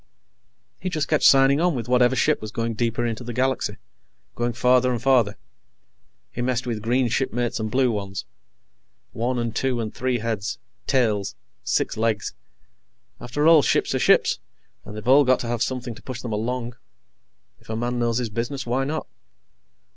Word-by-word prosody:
He 185 - -3
just 155 -5 -1
kept 155 - +1
signing 135 +2 +6
on 175 -3 +2
with 120 -2 -4
whatever 125 +1 +3
ship 150 +4 +2
was 110 - -5
going 115 0 -2
deeper 120 +2 -1
into 115 0 -3
the 120 0 -6
galaxy, 130 -5 0 0.6
going 120 0 -1
farther 125 +1 +3
and 120 - -1
farther. 120 -5 +2 0.9
He 120 - -5
messed 125 0 -1
with 115 -3 -3
green 120 +3 +1
shipmates 120 -1 -1
and 110 0 -2
blue 125 +1 +2
ones. 100 -3 -4 0.9
One 125 +3 -1
and 115 -2 -2
two 130 -2 0
and 110 -2 -4
three 130 -1 -1
heads, 115 0 -3 0.3
tails, 105 -7 +1 0.3
six - - 0
legs 110 -1 0 0.9
after 135 +5 -2
all, 165 -2 +8
ships - - +1
are - - 0
ships - - +3 0.5
and 105 - -9
they've 105 +2 -8
all 140 +3 +7
got 130 -1 +3
to 120 - -4
have 120 -1 -2
something 125 -2 -2
to 115 - -14
push 125 -2 -7
them 115 -3 -4
along. 120 +2 -3 0.8
If - - -23
a 110 - -2
man 120 +2 -2
knows 120 -1 +1
his 120 -3 -2
business, 120 +4 -3
why 125 +3 0
not? 155 +3 -3
120 Hz, 175 wpm, -23 LUFS, 115-130 Hz, 0.9 s, all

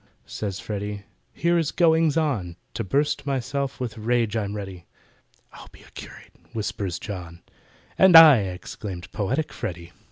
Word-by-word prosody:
Says 100 -3 -5
FREDDY, 105 0 -5 0.3
"Here 170 0 +1
is 160 -3 -1
goings 165 -3 +3
on! 115 - -1 0.2
To 115 - -3
bust 145 +8 0
myself 135 +1 -2
with 115 -3 -5
rage 115 -1 0
I'm 105 -2 -2
ready." 95 -4 -8 0.7
"I'll - - -13
be - - -17
a - - -19
curate!" - - -12 0.2
whispers 100 -5 -3
JOHN— 85 -5 -8 0.6
"And 190 -2 +7
I," 160 -4 +11
exclaimed 95 -1 -6
poetic 125 +9 -2
FREDDY. 85 -1 -6
110 Hz, 140 wpm, -24 LUFS, 95-145 Hz, 0.7 s, I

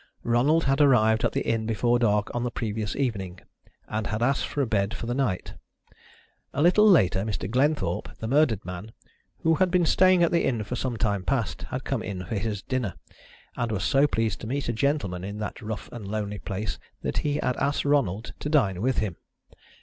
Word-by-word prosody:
Ronald 135 +8 +3
had 135 +2 +2
arrived 110 -6 +4
at - - +2
the - - -1
inn 115 -1 0
before 120 +2 +2
dark 105 -3 +1
on 120 - -1
the 125 - 0
previous 110 -2 -3
evening, 100 -9 -2 0.5
and 110 0 -2
had 110 +1 -1
asked 135 +3 +1
for 145 - -1
a - - +1
bed 100 -2 0
for - - -5
the 120 - -1
night. 125 -9 -1 1.0
A 140 - +1
little 210 +5 +6
later 95 - +5
Mr. 105 -3 -3
Glenthorpe, 140 +7 0
the 110 - -5
murdered 125 -6 +2
man, 90 +5 -7 0.5
who 165 - +4
had 185 - +4
been 175 -1 +3
staying 185 +1 +5
at 170 - +3
the 170 - +2
inn 115 -4 0
for 115 +4 -4
some 125 -1 -2
time 100 -3 0
past, 115 -1 -1
had - - -4
come - - -2
in 95 -2 -5
for 85 - -5
his 105 -1 -2
dinner, 125 -6 -2 0.6
and 120 -2 -2
was 100 -3 -1
so 140 +2 +4
pleased 115 -6 -1
to - - -6
meet 140 +4 -2
a 120 - 0
gentleman 110 -8 -1
in 100 +2 -5
that 105 +2 -5
rough 110 -1 -5
and 115 -5 -7
lonely 105 0 -3
place 105 +2 -4 0.2
that - - -1
he 145 -1 0
had 130 -4 0
asked 140 +1 0
Ronald 125 -7 +1
to 150 - -3
dine 100 - +2
with 130 +2 +1
him. 95 -6 -1
115 Hz, 210 wpm, -26 LUFS, 105-140 Hz, 1.0 s, little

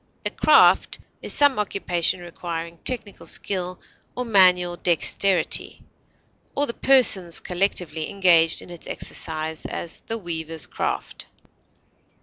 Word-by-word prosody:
A - - -1
craft - - +4 0.2
is - - -4
some 285 -5 +4
occupation 180 -3 -1
requiring 170 -1 -7
technical 230 -6 -4
skill 180 -2 -4 0.4
or 250 - -3
manual 180 -5 +4
dexterity, 175 +1 +1 0.7
or 285 - +1
the 235 - -4
persons, 215 -12 +3
collectively, 175 -4 -2
engaged 170 -4 +4
in - - -13
its 175 - -9
exercise; 160 0 -4
as, 170 - -6
the 225 - -2
weaver's 160 -6 -4
craft. - - -5
180 Hz, 115 wpm, -23 LUFS, 165-200 Hz, 0.7 s, craft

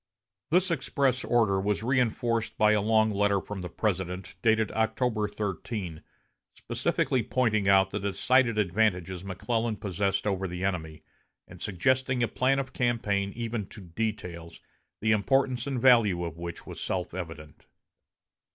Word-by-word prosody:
This 180 +3 +3
express 135 -3 0
order 110 -5 +2
was 105 +2 -1
reinforced 120 -2 0
by 105 0 +5
a 105 -1 +3
long 110 +1 +3
letter 100 -1 +2
from 95 0 -7
the 90 - -5
President, 95 -1 -2
dated 110 0 +2
October 110 0 0
13, 100 -4 -4 0.5
specifically 130 - 0
pointing 110 -4 +1
out 95 -1 +5
the - - -2
decided 115 +4 +2
advantages 95 -3 0
McClellan 110 +4 -2
possessed 100 0 -1
over 95 -2 0
the 90 +1 -5
enemy, 80 -5 -3 0.4
and - - -13
suggesting 130 +6 +1
a - - +2
plan 130 +5 +1
of 135 -1 -3
campaign 105 -5 0
even 115 -3 -3
to - - -12
details, 85 -3 -5 0.4
the 110 +1 +2
importance 125 +4 +1
and 135 -3 -1
value 115 -8 +5
of 85 -2 -6
which 85 0 -6
was - - -8
self 90 -3 -3
evident. 80 -4 -8
105 Hz, 140 wpm, -28 LUFS, 95-120 Hz, 0.5 s, by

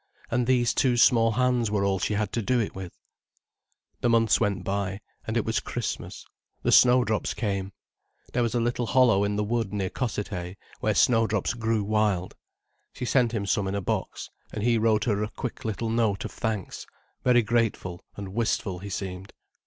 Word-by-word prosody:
And 120 0 +1
these 125 -2 +3
two 125 -2 +2
small 115 -1 +5
hands 125 -1 +1
were 100 -1 0
all 95 -1 +1
she 105 - -1
had 105 0 -1
to 115 - 0
do 125 +3 +1
it 110 - -2
with. 95 -2 -8 1.0
The 120 - +1
months 115 -2 +4
went 100 -2 0
by, 100 0 -2 0.3
and - - -1
it - - 0
was - - 0
Christmas—the - - -5
snowdrops 125 -4 +4
came. 100 -3 -2 0.6
There 125 - +1
was 120 0 0
a - - +2
little 120 0 -1
hollow 125 -6 +4
in 100 0 0
the 105 - 0
wood 115 -1 -1
near 95 -3 -2
Cossethay, 100 -7 -3 0.2
where 110 -1 0
snowdrops 115 -2 +2
grew 115 -2 0
wild. 105 -3 0 0.6
She 125 - -5
sent 125 -2 +2
him 105 -4 -2
some 100 +1 0
in 95 - -2
a - - 0
box, 90 - -3 0.2
and 105 - -4
he 115 -1 +3
wrote 110 -1 +2
her 105 -3 0
a 105 - -2
quick 125 +2 -6
little 110 +1 -2
note 110 -4 +1
of - - -5
thanks—very 110 +3 -2
grateful 105 -6 -1
and 100 -2 -7
wistful 105 -4 -1
he 100 +2 -7
seemed. 95 0 -5
110 Hz, 180 wpm, -26 LUFS, 100-120 Hz, 1.0 s, small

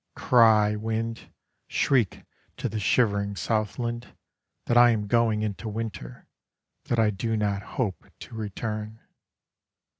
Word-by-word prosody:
Cry, 110 -3 +4
wind, 115 +1 -4 0.4
Shriek 125 -8 +1 0.3
to - - -2
the 110 0 -4
shivering 100 -1 +1
southland, 115 +6 -2 0.5
That 120 - +1
I 120 0 +8
am 110 -3 0
going 110 0 +2
into 110 +1 -4
winter, 105 - -6 0.6
That 120 - -1
I 110 -2 +3
do 110 +3 -2
not 100 -2 0 0.2
hope 105 -8 -2
to - - -10
return. 110 0 -5
110 Hz, 120 wpm, -26 LUFS, 105-115 Hz, 0.6 s, I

